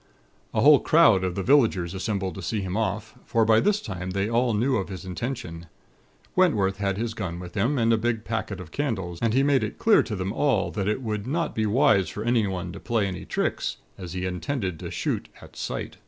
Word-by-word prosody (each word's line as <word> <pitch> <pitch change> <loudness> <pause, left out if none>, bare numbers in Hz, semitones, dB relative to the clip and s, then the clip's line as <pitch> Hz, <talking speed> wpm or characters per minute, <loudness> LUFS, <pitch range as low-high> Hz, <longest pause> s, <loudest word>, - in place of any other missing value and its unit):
"A - - 0
whole 145 0 +8
crowd 150 - +5
of 90 -1 -2
the 95 - -2
villagers 110 -10 +3
assembled 95 -1 -2
to 95 - -7
see 105 +4 -2
him 95 -1 -4
off; 110 0 -2
for 115 -1 +1
by 110 0 +5
this 210 - +2
time 95 - -5
they 100 +2 -1
all 120 0 +1
knew 125 +5 +2
of 95 - -3
his 95 -1 -7
intention. 90 -4 -5 0.7
Wentworth 105 - +3
had 100 -1 -1
his 115 +1 -2
gun 95 -6 -4
with 90 -1 -9
him, 120 +8 +1
and 115 -1 +3
a 110 - +2
big 115 -1 -1
packet 110 -4 -3
of 85 -3 -10
candles; 95 - -3
and 115 0 +1
he 135 - +4
made 140 -2 +3
it - - -4
clear 225 -2 +5
to 110 - -4
them 95 +1 -3
all 130 -9 +1
that 100 -2 -2
it 105 +5 -1
would 105 -2 -3
not 165 +5 -1
be 110 -1 0
wise 110 -4 +3
for 105 - -5
anyone 100 -7 0
to - - -8
play 115 -2 0
any 95 -2 -5
tricks; - - -2 0.2
as 90 -3 -8
he 90 0 -3
intended 95 - -3
to - - -6
shoot - - -2
'at - - -15
sight.' - - -5
105 Hz, 225 wpm, -25 LUFS, 95-120 Hz, 0.7 s, whole